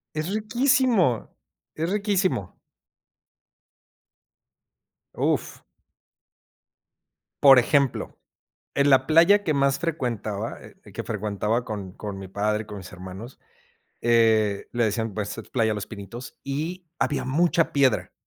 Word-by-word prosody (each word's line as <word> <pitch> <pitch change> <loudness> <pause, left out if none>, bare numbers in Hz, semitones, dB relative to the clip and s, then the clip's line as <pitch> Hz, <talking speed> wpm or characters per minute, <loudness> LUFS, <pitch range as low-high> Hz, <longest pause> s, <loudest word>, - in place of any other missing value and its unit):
Es 155 +3 -2
riquísimo, 225 - +1 0.4
es 165 +3 -2
riquísimo. 195 - -1 2.6
Uf. - - -1 1.8
Por 135 -2 +9
ejemplo, 140 +1 0 0.6
en 140 0 +3
la 130 -1 +4
playa 180 +6 +5
que 155 - +1
más 140 -1 +2
frecuentaba, 115 -10 -3
eh, - - -14 0.2
que - - -5
frecuentaba 105 +2 -2
con 100 -5 -6
con 100 -2 -6
mi 95 - -8
padre, 105 +2 -1
con 105 -2 -8
mis 95 - -11
hermanos, 95 +7 -10 0.6
eh, 110 -3 +3
le 120 -1 +1
decían, 110 0 -2
pues: 105 +1 -4
"Playa 110 -3 +1
Los 105 -1 -4
Pinitos" 110 +4 -9
y 165 +6 -4
había 145 - 0
mucha 165 +4 +2
piedra, 140 -2 +2
125 Hz, 110 wpm, -25 LUFS, 105-160 Hz, 2.6 s, Por